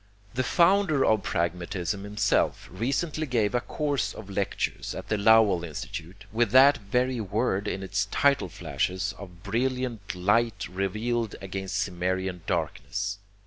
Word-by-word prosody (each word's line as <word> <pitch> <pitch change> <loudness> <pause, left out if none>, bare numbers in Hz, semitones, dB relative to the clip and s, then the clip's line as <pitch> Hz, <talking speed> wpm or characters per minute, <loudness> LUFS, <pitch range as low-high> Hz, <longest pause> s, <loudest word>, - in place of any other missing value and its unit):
The 125 - 0
founder 170 0 +3
of 110 -2 +3
pragmatism 90 +2 -2
himself 105 0 +1
recently 140 - -1
gave 115 -5 +1
a 120 - +2
course 145 -2 -2
of 100 -2 -9
lectures 100 0 -2
at - - -7
the 110 - +1
Lowell 105 -4 +5
Institute 85 +4 -7
with 115 +2 +2
that 140 +3 +8
very 125 +4 0
word 105 0 0
in 95 -1 -3
its 100 +1 0
title 140 +6 +2
flashes 95 +2 -2
of 90 -3 -11
brilliant 120 -1 -2
light 105 +5 +1
relieved 105 +5 -2
against 95 0 -2
Cimmerian 90 0 -2
darkness! 100 +2 -2
105 Hz, 135 wpm, -27 LUFS, 95-120 Hz, -, that